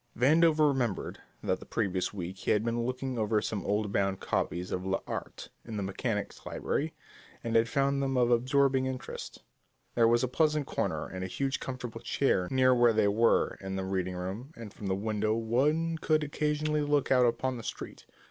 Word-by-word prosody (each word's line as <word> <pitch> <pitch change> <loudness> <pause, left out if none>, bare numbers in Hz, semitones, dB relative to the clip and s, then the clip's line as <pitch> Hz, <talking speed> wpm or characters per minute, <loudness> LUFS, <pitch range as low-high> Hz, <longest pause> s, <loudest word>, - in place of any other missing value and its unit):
Vandover 155 +3 +5
remembered 125 -8 -1 0.2
that - - 0
the - - -11
previous 95 -5 -1
week 95 -2 -5
he - - -4
had 105 +1 +3
been 120 0 0
looking 130 -1 -3
over 110 0 +2
some 105 -1 -3
old 105 0 0
bound 100 -1 0
copies 90 +1 -2
of 90 - -2
l'Art 95 0 -4
in 110 -2 -6
the 100 - -2
Mechanics 105 +2 -3
Library 155 +3 -2 0.5
and 115 -1 -2
had 115 0 +4
found 140 +2 +1
them 135 -1 0
of 120 -1 +3
absorbing 130 +2 +3
interest. 130 -1 -6 0.5
There 115 -1 +4
was 120 +2 +3
a - - +2
pleasant 150 +2 +1
corner - - -2
and 95 0 -6
a - - -2
huge 135 +7 -2
comfortable 125 -3 -6
chair 120 -6 +1
near 130 -1 +4
where 120 -2 +5
they 105 -2 +3
were 115 +3 +2
in 95 0 -4
the 95 0 -2
reading 95 -1 -2
room, 100 - -5
and 115 -3 -9
from 100 - -7
the 95 - +1
window 110 +1 0
one 150 +9 +1
could 155 -1 +2
occasionally 150 +1 0
look 145 -2 +1
out 125 -2 +5
upon 130 +2 -1
the 115 - -8
street. - - -7
120 Hz, 190 wpm, -30 LUFS, 105-135 Hz, 0.5 s, Vandover